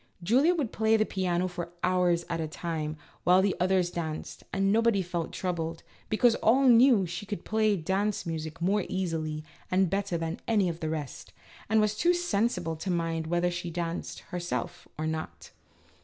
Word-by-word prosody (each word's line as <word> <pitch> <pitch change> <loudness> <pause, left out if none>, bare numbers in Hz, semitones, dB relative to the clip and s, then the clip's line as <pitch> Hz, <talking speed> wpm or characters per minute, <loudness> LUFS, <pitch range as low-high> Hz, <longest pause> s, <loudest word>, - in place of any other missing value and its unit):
Julia 265 - +4
would 280 -9 -1
play 220 0 +2
on - - +6
the 215 - +3
piano 185 -2 0
for 175 -1 -6
hours 180 -2 +2
at 165 -1 -2
a 160 - -2
time 155 -1 -4 0.3
while 180 - +5
all 185 - +6
the 195 -2 +1
others 180 -1 +2
danced, 160 -3 -5
and 195 0 +1
nobody 225 -2 +3
felt 170 -2 -3
troubled, 165 -3 -3 0.3
because 230 +2 +4
all 260 +5 +4
knew 240 -2 +7
that 180 - -3
she 205 +3 -5
could 205 - -5
play 215 -1 +2
dance 195 +5 -1
music 160 -1 -4
more 200 +2 +2
easily 160 -5 -2 0.3
and 185 -1 +2
better 195 -3 0
than 165 0 -3
any 205 -5 +3
of 165 0 -5
the 160 - -2
rest, 155 -4 -5 0.4
and 220 0 +4
was 215 0 +2
too 350 +10 +3
sensible 205 - 0
to 175 +5 -5
mind 165 -2 -1
whether 175 +1 +1
she 175 0 -4
danced, 170 0 -4
her 180 - -2
self, 175 0 -4
or 155 - -2
not. 160 0 -5
180 Hz, 190 wpm, -28 LUFS, 165-210 Hz, 0.4 s, knew